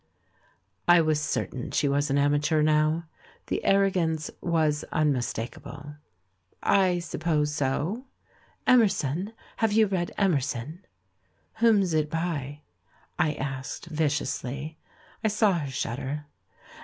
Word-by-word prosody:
I 175 0 +7
was 155 -2 +2
certain 135 -4 -3
she 145 - +1
was 145 +1 +1
an 140 - +2
amateur 145 +2 +2
now, 155 +2 +2 0.4
the - - -2
arrogance 180 -6 +2
was 155 -3 +1
unmistakable. 145 0 -2 0.7
"I 185 -3 +3
suppose 155 -3 -1
so." 150 - -1 0.6
"Emerson 195 - +3
— - - -25
Have 225 -2 +1
you 220 0 +5
read 185 -4 -1
Emerson?" 155 - -1 0.7
"Whom's 205 -6 +4
it 155 -1 +1
by?" 150 -4 -3 0.6
I 150 - +2
asked 135 +4 -5
\dciously. 150 -1 -2 0.5
I - - +3
saw 210 -1 +3
her 145 - -4
shudder. 135 +3 -3
155 Hz, 110 wpm, -27 LUFS, 145-180 Hz, 0.7 s, I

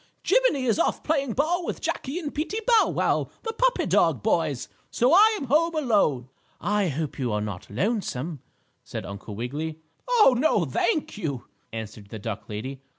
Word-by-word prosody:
Jiminie 475 - +3
is 225 -4 +2
off - - +1
playing 280 -6 0
ball 335 +7 +1
with - - -4
Jackie 275 +5 -3
and 305 -5 -4
Peetie 350 +9 -2
Bow 465 -3 +5
Wow, - - 0
the 450 - -3
puppy - - +2
dog - - +2
boys, - - 0 0.2
so 250 +5 +2
I 430 +3 +6
am - - -4
home 320 +5 +2
alone." 205 - +2 0.3
"I 205 -1 +1
hope 150 -1 -3
you 125 -3 -1
are 105 - 0
not 105 -4 -5
lonesome," 155 - -2 0.4
said - - -6
Uncle 100 +1 -8
Wiggily. 150 +8 -4 0.3
"Oh, 445 - +5
no, 240 - +2
thank 225 - -1
you," 140 - -3 0.3
answered 110 -2 -7
the 110 - -6
duck 105 0 -6
lady. 130 +6 -5
210 Hz, 170 wpm, -25 LUFS, -, 0.4 s, I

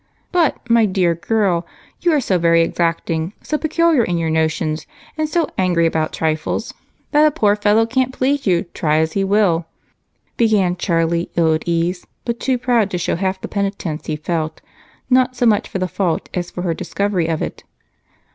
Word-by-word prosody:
"But, 335 -8 +1
my 230 -2 +4
dear 185 -3 +2
girl, 180 0 0 0.4
you 350 - +2
are 305 - +3
so 190 -8 0
very 170 0 +4
exacting, 165 +1 -1
so 305 - -2
peculiar 315 -3 +2
in 175 -4 -1
your 165 -1 -1
notions, 160 0 -1 0.3
and 310 -1 -1
so 335 0 +1
angry 175 -3 +2
about 160 -1 0
trifles 155 -1 -2 0.4
that 300 +1 +5
a - - +5
poor 215 -9 +2
fellow 210 +2 +3
can't 255 +2 0
please 270 0 0
you, 175 -2 +3
try 155 -3 +1
as 160 0 +1
he 195 - +1
will," 190 -5 +2 0.7
began 205 -6 +2
Charlie, 170 -1 0
ill 165 -2 +3
at 155 - -3
ease, 170 +2 0 0.2
but 235 -1 -2
too 260 -2 0
proud 240 -4 +1
to 180 - -2
show 175 - -1
half 190 +1 -2
the - - -5
penitence 195 -6 -3
he 155 - -1
felt, 155 +1 -3 0.5
not 255 0 +3
so 245 - 0
much 215 -3 +2
for - - -3
the 185 -1 -1
fault 180 -2 -2
as 175 -1 -3
for 180 - -6
her 170 -2 0
discovery 185 +1 -1
of 160 -1 -1
it. - - -6
185 Hz, 185 wpm, -19 LUFS, 165-230 Hz, 0.7 s, that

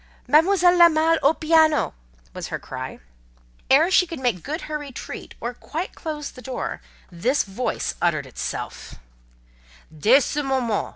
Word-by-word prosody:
"Mademoiselle 355 +5 +5
La 345 -1 +8
Malle 320 +1 +2
au 290 +4 +4
piano!" 315 -1 +3 0.4
was - - -6
her - - -3
cry. - - -7 0.7
Ere 310 +7 +5
she 365 -1 +4
could 330 -4 -7
make 240 -9 0
good 310 - -4
her 305 -1 -4
retreat, 280 -4 -8
or 240 +2 -4
quite 325 +8 -6
close 300 -3 -6
the 255 - -13
door, 260 0 -5 0.3
this 240 +12 +1
voice 205 +6 -3
uttered - - +1
itself:— - - -6 1.0
"Dès 240 - +5
ce - - -4
moment! 255 -6 -1
295 Hz, 150 wpm, -23 LUFS, 255-325 Hz, 1.0 s, La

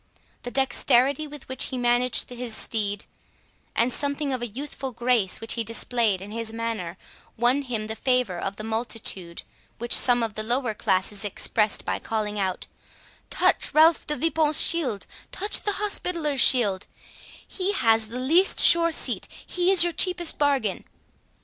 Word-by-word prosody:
The 245 - -6
dexterity 270 +2 +1
with 295 -1 -12
which 260 -1 -1
he 260 - -5
managed 245 0 +1
his 245 -2 -5
steed, 205 -2 -1 0.7
and 235 +1 +1
something 285 -1 -2
of 250 -2 -3
youthful 275 -2 -5
grace 235 -5 0
which 225 - -2
he 230 - -2
displayed 225 -3 0
in 200 +2 -9
his 225 0 -4
manner, 225 -6 -5 0.4
won 245 +5 +2
him 235 -5 -4
the 220 +1 -5
favour 250 -7 -1
of 195 +2 -4
the 215 - -8
multitude, 220 -6 -3 0.3
which 240 +1 0
some 245 -2 +4
of 225 -2 -3
the 215 - -3
lower 240 +1 -1
classes 195 0 -1
expressed 210 +1 0
by - - -2
calling 210 -2 -3
out, 190 -2 -2 0.6
"Touch - - +2
Ralph 315 +1 +4
de 300 - -1
Vipont's 310 +1 +1
shield—touch 330 - -1
the 415 - -1
Hospitallers 340 -9 -2
shield; 205 -7 +4 0.6
he 385 +1 -2
has 225 - +2
the 235 +3 -7
least 330 +9 +2
sure 335 0 +6
seat, - - -2 0.2
he 355 0 0
is 375 -3 +7
your 345 -1 -1
cheapest 355 -2 +2
bargain." 275 -9 0
245 Hz, 155 wpm, -24 LUFS, 220-290 Hz, 0.7 s, is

